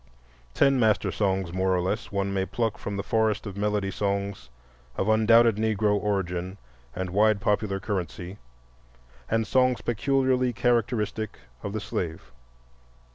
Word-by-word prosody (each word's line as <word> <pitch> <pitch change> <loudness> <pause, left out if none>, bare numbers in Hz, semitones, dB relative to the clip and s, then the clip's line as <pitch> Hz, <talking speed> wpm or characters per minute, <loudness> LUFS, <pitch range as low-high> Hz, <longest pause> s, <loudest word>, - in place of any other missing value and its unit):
Ten 135 -1 +4
master 110 -3 +2
songs, 95 -4 -1
more 95 0 +1
or - - +1
less, 95 +5 -2
one 100 0 -1
may 95 -1 +1
pluck 110 +1 -2
from 100 -1 -4
the 100 - -2
forest 110 0 +1
of 100 -3 -6
melody 105 -1 -1
songs 100 0 -2 0.5
of 95 - 0
undoubted 110 0 +5
Negro 110 -1 +1
origin 95 -2 -2 0.4
and 95 -1 -3
wide 105 +2 +3
popular 105 -1 0
currency, 95 -1 -4 0.9
and 115 0 +1
songs 130 0 +2
peculiarly 130 +1 +1
characteristic 115 -3 0 0.2
of 100 - -4
the 110 - -2
slave. 95 -3 -5
105 Hz, 135 wpm, -26 LUFS, 95-110 Hz, 0.9 s, undoubted